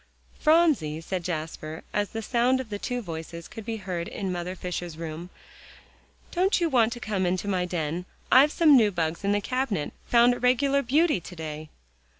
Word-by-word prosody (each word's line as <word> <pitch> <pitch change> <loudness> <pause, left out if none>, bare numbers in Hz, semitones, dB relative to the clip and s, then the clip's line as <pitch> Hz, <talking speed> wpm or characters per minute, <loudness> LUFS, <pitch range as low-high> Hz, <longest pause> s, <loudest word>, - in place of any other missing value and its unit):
"Phronsie," 305 - +3
said 180 +2 -4
Jasper, 160 -1 -5
as 205 -1 0
the 225 0 -5
sound 245 +3 +2
of 260 -4 -6
the 205 -1 -4
two 245 +2 -3
voices 165 -1 -7
could 225 - -9
be 225 +1 -4
heard 180 -4 -4
in 195 -2 -4
Mother 180 +1 -4
Fisher's 175 -2 -5
room, 165 +1 -6 1.0
"don't 380 +3 +2
you 340 -2 +1
want 235 -5 +3
to 240 - -8
come 210 -5 -2
into 185 +2 -1
my 185 -3 0
den? 175 0 -3 0.3
I've 275 +4 +7
some 310 -4 +6
new 225 -5 +5
bugs 170 -1 -2
in 200 - +1
the 205 0 +1
cabinet 240 - -2
found 240 +1 +5
a - - -5
regular 275 +3 +3
beauty 295 - +2
to 180 +1 -11
day." 155 -1 -6
200 Hz, 185 wpm, -26 LUFS, 170-250 Hz, 1.0 s, I've